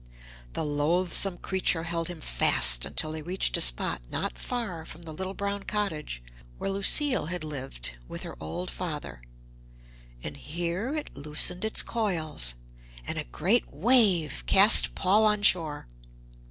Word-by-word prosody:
The - - -2
loathsome 175 +5 0
creature 185 -3 0
held 165 0 -2
him 175 -3 -7
fast - - +4
until 155 - -1
they 155 0 -5
reached 180 +5 0
a - - +1
spot - - +3
not - - -3
far 210 -10 -4
from 165 +1 -8
the 160 -1 -8
little 190 +4 -5
brown 200 0 -3
cottage 160 - -3 0.3
where 195 - -2
Lucile 245 - +3
had 175 -1 -4
lived 130 - -4
with - - -7
her - - -7
old 175 - -5
father, 150 - -6 1.0
and 75 -1 -6
here 175 - -3
it 300 - -5
loosened 155 +6 0
its 220 - +2
coils; 160 - -2 0.5
and - - -3
a - - -4
great 190 - 0
wave 190 - +2
cast 200 +3 +6
Paul 200 +3 +3
on 210 -1 +2
shore. 160 -7 +3
170 Hz, 145 wpm, -27 LUFS, 150-200 Hz, 1.0 s, cast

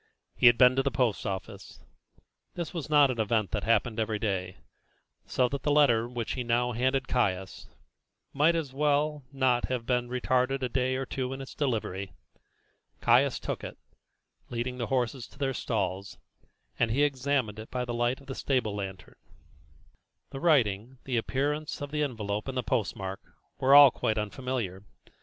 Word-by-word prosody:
He - - +5
had 120 -1 +7
been 125 0 +6
to - - +4
the 140 - 0
post 120 -4 0
office. 95 -1 -6 0.8
This 170 -4 -4
was 160 -4 -5
not 145 -3 +5
an 120 - -5
event 110 -1 0
that 105 - -2
happened 115 0 +1
every 110 -1 0
day, 95 -4 -2 0.7
so 125 - +2
that 140 +1 -4
the - - -1
letter 120 -6 +4
which 120 -2 -4
he 125 - -2
now 120 +1 +1
handed 130 +3 0
Caius 95 -6 -1 0.7
might 150 +4 +3
as 150 -5 -3
well 150 +1 +1
as 140 - -31
not 130 -2 +2
have 125 -2 -3
been 125 -1 0
retarded 130 +1 0
a 125 - 0
day 130 +1 0
or 135 +1 -2
two 130 0 -3
in 135 - -7
its 135 - -8
delivery. 100 -8 -2 0.9
Caius - - +4
took - - -4
it, - - -7 0.7
leading 125 +1 -3
the 120 - -2
horses 125 -1 -1
to - - -20
their 135 -1 -1
stalls, 100 -5 -3 0.6
and 120 - +2
he 135 +6 +2
examined 135 -6 0
it 110 - -9
by 125 -1 -2
the 120 - -4
light 120 +2 0
of 140 - -17
the 135 - -6
stable 125 -7 -1
lantern. 95 -2 -7 1.1
The 135 - -6
writing, 125 - +2
the 125 -3 -2
appearance 145 +6 -2
of 145 0 -6
the 150 0 -1
envelope 105 -6 -2
and 135 -1 -4
post 120 -5 0
mark, 95 -2 -5 0.4
were 135 +2 +5
all 145 -2 +10
quite 110 - -1
unfamiliar. 105 -3 -3
125 Hz, 175 wpm, -28 LUFS, 110-135 Hz, 1.1 s, all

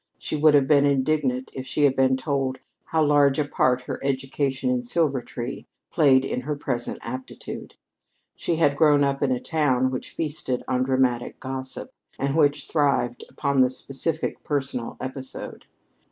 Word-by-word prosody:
She - - -4
would 150 0 +5
have 140 -2 +4
been 145 -1 +5
indignant 135 -2 0
if 130 0 -6
she 145 +4 0
had 135 -2 +4
been 130 0 +3
told 135 -1 -1 0.3
how 160 -1 +1
large 145 -2 +4
a 150 - +1
part 130 -3 +1
her - - -6
education 135 - -1
in 250 -1 +1
Silvertree 140 - -2 0.2
played 135 -4 +4
in 125 - -2
her 150 +3 -3
present 120 -4 -3
aptitude. 130 +2 -7 0.6
She 170 - -1
had 145 -3 +3
grown 145 -1 +5
up 140 0 0
in 140 -2 +2
a 125 - +1
town 130 -5 +1
which 130 - -5
feasted 150 -5 -3
on 125 - 0
dramatic 130 -2 0
gossip, 130 - -6 0.3
and 140 +1 -1
which 145 -2 +2
thrived 140 -5 +1
upon 140 -1 +1
the 130 - +5
specific 140 +5 -2
personal 130 -5 -2
episode. 130 0 -7
135 Hz, 160 wpm, -24 LUFS, 130-150 Hz, 0.6 s, would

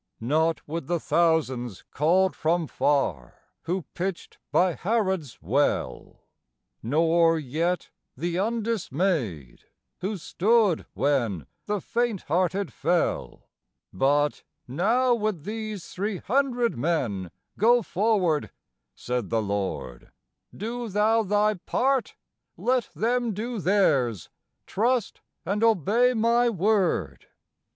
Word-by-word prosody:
Not 160 +7 0
with 160 -2 -4
the 175 0 0
thousands 140 - 0
called 180 +6 +2
from 165 +1 +1
far, 135 - 0 0.3
who 180 +2 -1
pitched 185 0 -5
by 180 0 +3
Harod's 190 - -1
well; 135 - -1 0.6
Nor 165 +6 +3
yet 160 +5 -2 0.3
the 170 +4 -2
undismayed 185 - -2 0.3
who 200 +3 -3
stood 205 +1 +2
when 120 - 0 0.2
the 210 -1 0
faint 235 0 -1
hearted 185 +4 0
fell; 165 - -1 0.5
But 145 +7 +1 0.3
"Now, 230 - +2
with 215 -8 -1
these 215 -2 -5
three 200 +1 -3
hundred 245 +2 0
men, 115 - -1 0.3
go 235 +3 +5
forward," 185 -6 +1 0.5
said 125 -5 -3
the 115 - +1
Lord; 95 -12 -4 0.4
"Do 235 +3 -5
thou 215 +3 +3
thy 210 +1 +2
part, 255 +7 0 0.4
let 250 -2 0
them 235 -1 0
do 230 +2 -3
theirs, 145 - +1 0.3
trust, 235 +1 0 0.2
and 200 +5 -1
obey 230 - +3
my 235 +2 +3
word." 185 - 0
180 Hz, 105 wpm, -26 LUFS, 145-220 Hz, 0.6 s, go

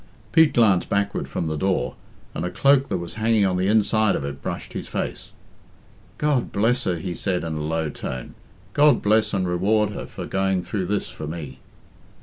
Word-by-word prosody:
Pete 160 -2 +6
glanced 105 -6 +4
backward 100 0 0
from - - -3
the 80 -1 -2
door, 75 -7 0 0.4
and - - -3
a 90 - -1
cloak 140 +5 +3
that 95 - -1
was 85 -1 -6
hanging 110 -2 +3
on 95 -1 +1
the 90 +1 +1
inside 110 0 +3
of 70 - -3
it 70 -1 -6
brushed - - -5
his - - -5
face. - - -4 0.9
"God 150 -4 +1
bless 120 +5 +1
her!" 90 - +1
he 90 +2 -4
said 90 -1 -1
in 80 -1 -3
a 75 - -3
low 80 +1 -1
tone. 65 -3 -6 0.4
"God 145 0 +4
bless 110 +1 +3
and 95 -3 0
reward 105 +4 +2
her - - -6
for - - -7
going 95 -1 0
through 95 -3 -3
this 105 -1 -1
for 90 -4 -7
me!" 75 -5 -7
95 Hz, 195 wpm, -23 LUFS, 85-110 Hz, 0.9 s, Pete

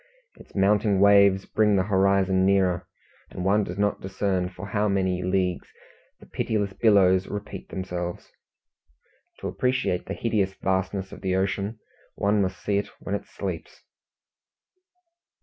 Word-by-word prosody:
Its - - -18
mounting 100 0 +3
waves 100 -1 +5
bring 105 -2 +2
the 95 - +3
horizon 95 -1 +2
nearer, 95 -2 +2 0.4
and 90 - -6
one 105 +2 +3
does 90 -1 -6
not 100 0 0
discern 95 -1 -1
how - - -11
for 105 +1 -1
many 95 -2 0
leagues 90 -1 -1 0.5
the - - -15
pitiless 105 -3 -2
billows 95 -4 +4
repeat 105 0 -7
themselves. 90 -2 -5 1.1
To - - -3
appreciate 125 -8 -1
the 100 - -4
hideous 100 -5 0
vastness 95 0 -2
of - - -10
the 95 -1 0
ocean 100 +3 -1 0.4
one 100 +1 +2
must 95 -1 -3
see 100 -1 +1
it 100 - -4
when 100 - -5
it 100 - -3
sleeps. - - -6
95 Hz, 140 wpm, -25 LUFS, 95-100 Hz, 1.1 s, waves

